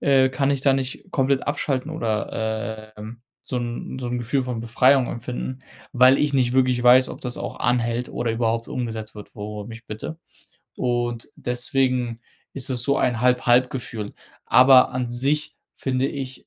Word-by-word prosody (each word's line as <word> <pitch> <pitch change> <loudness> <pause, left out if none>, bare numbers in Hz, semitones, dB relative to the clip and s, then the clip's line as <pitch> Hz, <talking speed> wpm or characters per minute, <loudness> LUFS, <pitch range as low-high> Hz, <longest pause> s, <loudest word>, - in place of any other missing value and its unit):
äh, 135 -2 +4
kann 135 +2 0
ich 140 - -1
da 135 -1 +4
nicht 135 -1 -3
komplett 135 0 +1
abschalten 145 0 -1
oder, 110 -4 -3
ähm, 110 +3 -9 0.2
so 125 - -4
'n 120 +2 -4
so 125 - -4
'n 120 0 -2
Gefühl 125 +3 0
von 125 -3 -4
Befreiung 125 +3 +3
empfinden, 125 +2 -5 0.3
weil 130 +2 +6
ich 150 -1 +1
nicht 125 -3 +2
wirklich 125 -1 +2
weiß, 125 +1 +6
ob - - -8
das 125 -1 -3
auch - - -6
anhält 120 0 0
oder 120 -1 -2
überhaupt 115 0 -1
umgesetzt 110 -3 -5
wird, 105 - -11
worum 105 +1 -7
ich 115 +1 -11
bitte. 110 +10 -6 0.6
Und 120 -1 -2
deswegen 125 -2 -1 0.3
ist 135 -1 -5
es 125 -2 -1
so 140 +1 +1
ein 120 -2 +1
halb 125 0 +3
halb 125 +1 +4
Gefühl, 115 -5 -6 0.3
aber 130 0 +7
an 125 -1 -3
sich 140 +5 -1 0.2
finde 130 0 -1
ich 135 -2 -6
125 Hz, 170 wpm, -23 LUFS, 115-130 Hz, 0.6 s, aber